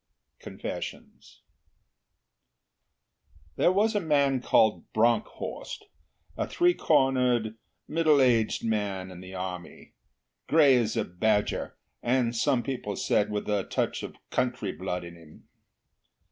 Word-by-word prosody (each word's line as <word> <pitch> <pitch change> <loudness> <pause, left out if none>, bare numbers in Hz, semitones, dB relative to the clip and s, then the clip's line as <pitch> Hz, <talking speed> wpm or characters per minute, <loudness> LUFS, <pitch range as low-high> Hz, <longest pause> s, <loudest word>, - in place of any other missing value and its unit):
CONFESSIONS - - -8 2.1
There - - +3
was 210 +4 +2
a 205 - +1
man 140 -6 +2
called 110 -3 +2
Bronckhorst 120 - -1 0.5
a - - -2
three 355 0 +3
cornered, 125 - +2 0.3
middle 155 -2 +3
aged 115 -4 +2
man 100 -4 -2
in 90 - -10
the 95 +1 -10
Army 90 -1 -7 0.5
grey 145 -4 +6
as 115 -3 0
a - - +1
badger, 105 +4 -1 0.2
and, 120 -1 +1
some 125 +1 +1
people 120 -7 -4
said, 105 +2 +1
with 105 -1 -3
a 105 -2 0
touch - - -2
of - - -7 0.2
country 125 -6 -1
blood 90 -1 -4
in 85 0 -10
him. 80 -2 -17
115 Hz, 120 wpm, -27 LUFS, 100-135 Hz, 2.1 s, grey